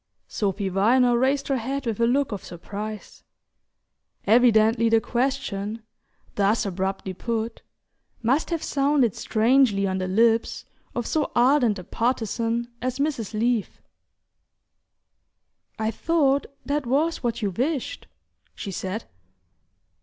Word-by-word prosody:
Sophy 200 -1 -2
Viner 240 +6 +3
raised 270 +3 +1
her 275 - +1
head 270 +3 -3
with 225 -2 -2
a 230 - +3
look 270 +2 +1
of 205 - -5
surprise. 205 +5 -7 1.0
Evidently 225 0 +4
the 225 0 +5
question, 230 -4 -2 0.5
thus 205 +3 +1
abruptly 190 0 -3
put, 230 +3 -3 0.6
must 265 +7 +1
have 335 -2 -2
sounded 275 -5 +2
strangely 225 -3 +2
on 190 -1 -1
the 185 - -2
lips 225 +4 +2 0.3
of 240 - -2
so 310 - -1
ardent 245 -3 +4
a 185 - -7
partisan 230 +1 -1
as 255 0 -2
Mrs. 275 -7 -2
Leath! 235 -3 0 2.0
"I 220 0 -1
thought 285 +1 +1 0.2
that 290 -2 -1
was 305 +6 +1
what 235 -2 -2
you 200 - 0
wished," 280 - -2 0.5
she 200 - -6
said. 190 +4 -4
230 Hz, 120 wpm, -24 LUFS, 210-265 Hz, 2.0 s, the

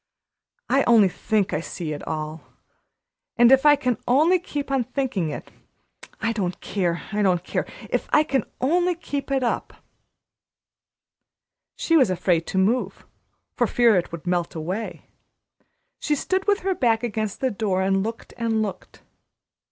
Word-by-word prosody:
I 270 +2 +3
only 220 -5 +6
think 205 +2 -1
I 150 - +1
see 165 -2 -5
it 145 - -6
all; 155 0 -4 1.0
but 240 +1 +6
if 270 +2 +6
I 295 - +8
can 250 -6 -1
only 315 +9 +4
keep 290 -5 -5
on 270 -2 +2
thinking 250 - -2
it, 145 - -7 0.7
I 225 +1 0
don't 185 -5 -3
care 175 -4 -2
I 210 0 0
don't 180 -3 +2
care - - -2 0.2
if - - -2
I 300 - +5
can 270 -6 0 0.2
only 350 +6 +2
keep 290 -5 -5
it 270 -1 +1
up!" 235 - -2 2.0
She 330 - +1
was 265 -10 +5
afraid 175 -2 +1
to - - -3
move, 215 +7 0 0.5
for - - +1
fear 235 -3 +4
it 180 - 0
would 170 0 -8
melt 175 -1 -1
away. 185 +8 -4 0.9
She 300 - 0
stood 375 +7 -1
with 405 0 +2
her 385 +1 0
back 235 -8 +1
against 215 -3 -3
the 260 -1 0
door 195 -3 0
and 195 0 +2
looked 225 +3 -6
and 225 -2 0
looked. 200 -3 -7
225 Hz, 160 wpm, -24 LUFS, 185-270 Hz, 2.0 s, I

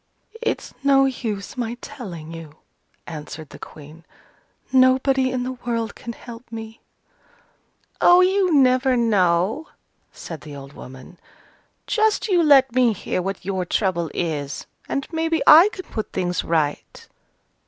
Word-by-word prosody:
"It's 470 - -3
no 275 -1 +5
use 225 -6 -4
my 240 -1 -3
telling 185 - -9
you," 160 -2 -10 0.5
answered 155 -1 -8
the - - -12
Queen, 155 +2 -12 0.7
"nobody 260 0 +4
in 255 -1 -2
the 255 - -3
world 235 -2 -3
can 235 - -8
help 235 +1 -11
me." 225 0 -8 1.2
"Oh, 355 +1 +7
you 375 0 +2
never 255 -2 +4
know," 205 - +1 0.4
said 165 -3 -9
the 150 -2 -10
old 140 0 -11
woman. 130 +8 -12 0.7
"Just 440 0 +1
you 360 -3 +4
let 270 -5 +5
me 250 -3 +3
hear 185 - -3
what 190 0 -5
your 190 -1 -1
trouble 175 -2 -1
is, 150 -4 -3 0.2
and 275 - -2
maybe 325 0 0
I 335 +7 +9
can 370 - -9
put 220 - -5
things 180 -1 -1
right." 155 -3 -2
230 Hz, 135 wpm, -22 LUFS, 170-270 Hz, 1.2 s, I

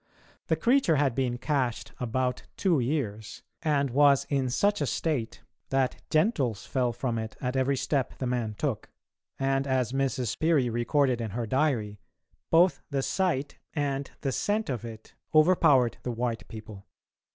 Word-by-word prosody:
The - - +2
creature 245 - +3
had 140 -3 +2
been 125 -1 -1
"cached" 130 -3 -1
about 125 +1 -1 0.2
two 175 -7 +2
years, 120 -5 -3 0.2
and 140 -4 +1
was 140 +1 +5
in 135 -2 +1
such 205 +10 +1
a - - +1
state 140 -9 -2 0.3
that 135 -1 0
gentles 150 - +1
fell 125 -2 0
from 120 -1 -2
it 110 0 -6
at 125 0 -2
every 135 +1 +1
step 135 0 -1
the 130 - -3
man 120 -4 -1
took, 130 -3 -3 0.5
and, 135 0 0
as 130 -3 +1
Mrs. 130 -3 -1
Peary 155 -7 +2
recorded 120 +1 +1
in 115 - -3
her 120 - -1
diary, 115 -5 0 0.5
both 170 +3 +4
the 140 -2 -1
sight 165 -7 -1 0.2
and 140 -2 -1
the 135 - -1
scent 205 - -1
of 120 -3 -4
it 110 -2 -10 0.2
overpowered 155 -7 +5
the - - -4
white 120 -1 -3
people. 110 -2 -10
130 Hz, 155 wpm, -28 LUFS, 120-145 Hz, 0.5 s, was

